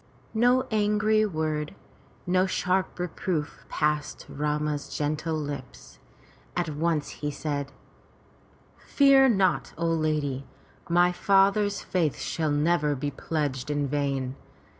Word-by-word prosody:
No 245 +3 +4
angry 215 0 +2
word, 155 -4 -2 0.5
no 185 +1 +2
sharp 185 0 0
reproof 175 -3 -3
passed 150 -1 -1
Rama's 150 0 -2
gentle 155 +2 -1
lips. 145 -4 -7 0.6
At 175 -2 0
once 155 0 -1
he 150 - -1
said: 145 -1 -3 1.1
"Fear 275 -1 +5
not, 195 -5 +1
O 170 - -1
lady, 155 -4 0 0.4
my 175 +1 +4
father's 200 +2 +2
faith 165 -6 0
shall 160 -2 -2
never 150 0 +2
be 145 +2 -3
pledged 140 -2 -3
in 145 -1 0
vain. 135 -2 -1
155 Hz, 110 wpm, -27 LUFS, 145-185 Hz, 1.1 s, Fear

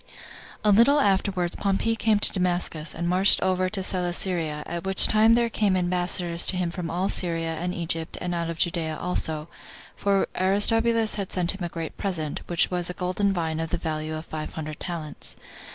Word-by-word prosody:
1. 210 -1 +4
A - - +5
Little 280 +7 +5
afterward 190 -6 +1
Pompey 200 +3 0
came 220 -1 +2
to 205 - +2
Damascus, 175 -4 -1
and 170 +1 -3
marched 185 +3 +4
over 185 0 +1
Celesyria; 180 -5 -1
at 170 0 -5
which 190 0 +7
time 220 +1 +5
there 235 0 +2
came 210 -4 +1
ambassadors 175 -1 0
to 185 - +2
him 175 -2 -1
from 175 -1 -5
all 180 +4 -1
Syria, 165 -4 0
and 175 +2 -3
Egypt, 165 -2 -2
and 175 0 -3
out 170 -1 -2
of 165 - -5
Judea 165 -2 -1
also, 160 -3 -2 0.5
for 200 -1 +1
Aristobulus 225 +4 +3
had 195 - -7
sent 180 -1 0
him 195 -2 -7
a 175 - -3
great 165 -1 -6
present, 160 -7 -3
which 175 +1 +1
was 180 -1 -1
a 180 - -5
golden 190 +2 0
vine 165 -4 -2
3 165 - -2
of - - -10
the 175 - -1
value 155 -1 -4
of 155 +1 -7
five 155 -1 -6
hundred 155 -1 -6
talents. 160 -4 -6
180 Hz, 195 wpm, -25 LUFS, 165-195 Hz, 0.5 s, which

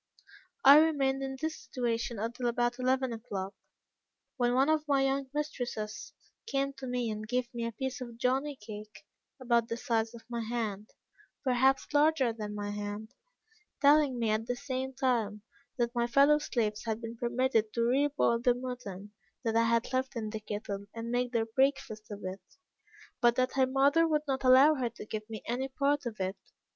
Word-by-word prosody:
"I 285 +2 +10
remained 275 -4 +2
in 270 0 -4
this 315 +2 -2
situation 235 -2 -2
until 235 +4 -2
about 240 +1 0
eleven 255 -1 +1
o'clock, 200 -4 -5 0.8
when 245 -2 +1
one 265 +2 +4
of 310 -1 +1
my 275 -2 +3
young 270 0 -1
mistresses 245 -8 -4 0.3
came 275 -7 0
to 265 - -6
me 245 -2 -1
and 215 0 -5
gave 250 +1 -1
me 235 -1 -2
a - - -4
piece 265 +3 -4
of 235 -2 -7
jonny 270 +4 0
cake 210 -3 -10 0.3
about 235 -2 +2
the 230 - -3
size 230 -1 -1
of 225 -1 -13
my 235 -1 -3
hand, 220 -3 -3 0.5
perhaps 265 +2 +2
larger 290 -5 +3
than 210 -2 -6
my 205 0 -3
hand, 205 +1 -5 0.7
telling 290 -2 +5
me 230 -2 +1
at 220 +1 -1
the 245 - -1
same 260 0 -3
time, 230 -6 0 0.3
that 240 -1 0
my 240 -1 +1
fellow 280 +4 +5
slaves 225 -8 -2
had 220 -1 -2
been 230 0 -6
permitted 235 -2 +1
to 235 - +1
re 265 +5 +3
boil 275 -5 +1
the 245 0 +3
mutton 245 -6 -7 0.3
that 225 -2 0
I 230 0 +4
had 230 +2 +1
left 260 0 -1
in 215 -2 -3
the 220 - -4
kettle, 205 -1 -5
and 230 +1 -5
make 245 0 0
their 230 -2 +1
breakfast 225 -3 0
of 205 -1 -8
it, 185 +1 -5 0.8
but 240 0 +5
that 255 +1 +1
her 265 -1 +3
mother 280 +5 +4
would 300 -2 +1
not 270 -1 -1
allow 260 +4 +7
her 255 -5 -1
to 230 - -10
give 215 0 -6
me 220 -2 -7
any 250 +3 -2
part 280 0 0
of 220 -3 -7
it. 190 +1 -2
240 Hz, 185 wpm, -31 LUFS, 225-270 Hz, 0.8 s, I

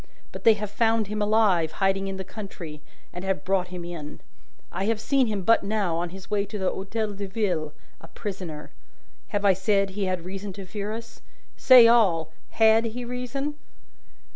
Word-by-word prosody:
But - - -10
they 225 -1 +7
have 210 -1 -5
found 225 0 +2
him 210 0 -2
alive, 205 -6 +3
hiding 195 0 0
in 195 0 -4
the 190 - -4
country, 180 -6 -8 0.3
and 180 - -6
have 190 0 -1
brought 185 -1 +1
him 180 -1 -7
in. 160 -4 -7 0.5
I 195 - -2
have 225 0 0
seen 265 +2 +2
him 205 -3 -2
but 230 +4 +4
now, 200 -4 -1
on 175 +1 -2
his 190 +1 -11
way 205 -1 +2
to 205 +1 -6
the 190 -2 0
Hotel 210 +2 -3
de 200 0 -5
Ville, 185 -7 -1 0.3
a 165 - -13
prisoner. 180 -6 -7 0.6
I 205 - +1
have 190 -2 +4
said 195 0 +2
that - - -11
he 200 0 -2
had 185 -2 -2
reason 195 +1 -6
to 195 0 -8
fear 205 +2 -5
us. 225 +1 -8 0.3
Say 250 -3 +8
all! 180 -9 +3 0.2
Had 225 0 +4
he 240 +2 -4
reason?" 250 +4 -4
200 Hz, 190 wpm, -25 LUFS, 185-220 Hz, 0.6 s, Say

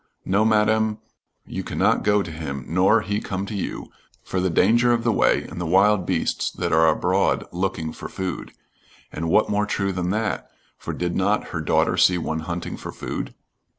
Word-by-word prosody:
'No, 100 +3 +2
Madam, 110 0 +2 0.5
you - - -5
cannot - - +1
go 105 -1 +3
to 85 - -7
him, 70 -4 -5
nor 95 +6 +3
he 105 +1 -2
come 95 0 -3
to 110 - -7
you, 100 - -5 0.3
for 95 - -2
the 95 - +1
danger 115 +8 +4
of 115 -1 0
the 115 - +2
way - - +2
and 85 - -7
the - - -2
wild 95 +2 +3
beasts 90 -3 0
that - - -3
are 80 0 +5
abroad 80 - +2
looking 90 -3 -2
for - - -8
food.' 95 -4 -5 0.6
And 80 +2 -3
what 105 +4 +3
more 105 0 +1
true 100 -1 -1
than 90 -1 -2
that, 110 +2 -2 0.3
for - - -6
did 90 -1 -3
not 100 +3 +1
her 80 - -3
daughter - - +1
see 90 - +5
one 80 -2 -2
hunting 85 +2 -5
for - - -7
food? - - -5
95 Hz, 190 wpm, -23 LUFS, 85-105 Hz, 0.6 s, are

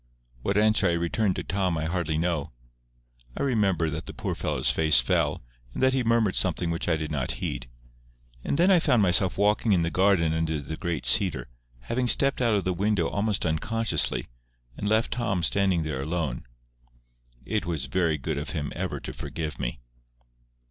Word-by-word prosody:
What 100 +9 -1
answer 110 0 +3
I 85 - +2
returned 90 +4 0
to - - -4
Tom 95 -3 -1
I 80 - -2
hardly 80 -2 -1
know. 80 -5 -1 0.8
I - - -1
remember 100 -10 +1
that 80 +2 -6
the - - -8
poor - - -3
fellow's - - 0
face 80 -2 +4
fell, - - 0 0.3
and - - -2
that 130 0 +4
he 130 -1 +1
murmured 115 -4 +2
something 90 -1 +2
which 85 +1 -2
I 80 - +2
did 80 0 -5
not 65 -4 -2
heed. - - -5 0.7
And - - -1
then 180 +4 +4
I 180 - +6
found 125 -10 +3
myself 90 0 +3
walking 105 +2 +2
in 85 -3 +2
the 85 - -1
garden 95 -4 +3
under 80 -1 -1
the 75 +3 -6
great 80 -5 -4
cedar, 65 -1 +2 0.3
having 125 - -1
stepped 135 +2 +2
out 115 -3 +3
of 100 - 0
the 90 - 0
window 100 -2 0
almost 100 -1 -1
unconsciously, 85 +2 0 0.5
and 105 - -3
left 110 +1 +2
Tom 95 -7 -1
standing 95 -3 +2
there 75 -4 -3
alone. 80 -4 -3 1.0
It 110 -5 -2
was 80 -6 -2
very 80 +2 0
good 75 +1 -3
of 75 - -6
him 75 -1 -3
ever - - -3
to - - -6
forgive 75 -4 -5
me. - - -4
90 Hz, 185 wpm, -26 LUFS, 80-105 Hz, 1.0 s, I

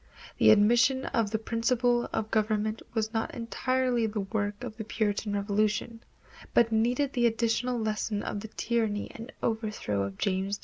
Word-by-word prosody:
The - - +6
admission 235 +5 +5
of 225 -3 0
this 220 +1 -2
principle 240 +1 +1
of 215 0 -2
government 215 0 0
was 220 0 -1
not 225 -1 -2
entirely 245 0 0
the 210 -1 -2
work 205 +2 -3
of 240 -3 -6
the 220 - -4
Puritan 210 -1 -1
Revolution, 210 +3 0 0.5
but 230 -1 +5
needed 245 +5 +1
the 240 -2 +3
additional 230 +2 0
lesson 215 -1 -1
of 205 - -3
the 220 - -7
tyranny 220 -2 -1
and 230 +4 -9
overthrow 215 - -1
of 100 0 -4
James 195 +1 -1
II. - - -30
220 Hz, 165 wpm, -29 LUFS, 210-235 Hz, 0.5 s, The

